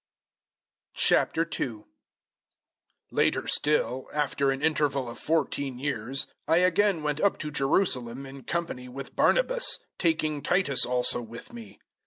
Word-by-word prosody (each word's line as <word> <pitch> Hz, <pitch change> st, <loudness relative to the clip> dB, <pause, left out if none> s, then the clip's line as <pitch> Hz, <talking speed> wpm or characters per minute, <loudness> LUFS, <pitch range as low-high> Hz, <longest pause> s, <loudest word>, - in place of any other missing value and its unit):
002:001 130 Hz, -9 st, +1 dB, 1.3 s
Later -, -, +2 dB
still, 130 Hz, -3 st, +1 dB
after 145 Hz, -2 st, 0 dB
an 135 Hz, 0 st, 0 dB
interval 145 Hz, -4 st, +1 dB
of 120 Hz, -, -8 dB
fourteen 140 Hz, -4 st, -1 dB
years, 135 Hz, 0 st, -2 dB, 0.2 s
I 160 Hz, -, +4 dB
again 180 Hz, -1 st, +3 dB
went 150 Hz, 0 st, -1 dB
up 200 Hz, -, +3 dB
to 150 Hz, -, -5 dB
Jerusalem 135 Hz, -4 st, 0 dB
in 135 Hz, 0 st, -11 dB
company 165 Hz, -7 st, -3 dB
with 135 Hz, +2 st, -8 dB
Barnabas, -, -, +2 dB, 0.2 s
taking 155 Hz, -3 st, +1 dB
Titus 180 Hz, -7 st, +3 dB
also 125 Hz, -1 st, +1 dB
with 115 Hz, -, -10 dB
me. 235 Hz, -2 st, -10 dB
145 Hz, 120 wpm, -27 LUFS, 130-165 Hz, 1.3 s, I